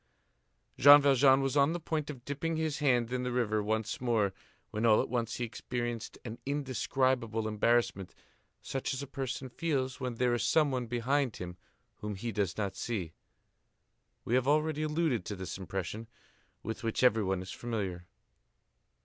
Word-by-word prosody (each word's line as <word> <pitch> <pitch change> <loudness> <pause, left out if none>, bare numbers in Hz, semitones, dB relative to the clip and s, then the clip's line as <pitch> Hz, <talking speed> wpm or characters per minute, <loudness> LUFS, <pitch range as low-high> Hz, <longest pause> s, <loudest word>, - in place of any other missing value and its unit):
Jean 145 +2 +10
Valjean 135 -1 +5
was 135 +1 -1
on 140 +2 +4
the 175 - -2
point 155 -2 -3
of 130 -5 -8
dipping 160 +3 -2
his 160 -2 -1
hand 125 -5 +2
in 125 - 0
the 125 0 -2
river 110 -4 +1
once 110 +2 -2
more, 110 -6 +1 0.4
when, 105 - -2
all 110 -2 +6
at - - -1
once, 120 -1 -1
he 120 - -3
experienced 120 0 -4
an 115 0 -6
indescribable 130 -4 0
embarrassment, 110 -3 +1 0.5
such 135 0 -2
as 135 - -4
a - - -4
person 135 -1 -4
feels 130 -1 -2
when 125 -2 -3
there 125 +1 +2
is 120 - 0
some 145 +5 +3
one 125 -2 -2
behind 125 +2 0
him 90 -1 -6 0.4
whom 105 -1 -5
he 115 +4 -4
does 100 -4 -1
not 100 -3 -2
see. 95 -9 -3 1.1
We 115 - -2
have 130 +1 +3
already 155 +1 +2
alluded 155 - 0
to 105 - -4
this 95 -3 -5
impression, 95 +4 -5 0.6
with 110 +2 -4
which 115 +2 -1
everyone 100 -6 +3
is 95 - -8
familiar. 95 -7 -4
120 Hz, 165 wpm, -31 LUFS, 110-135 Hz, 1.1 s, Jean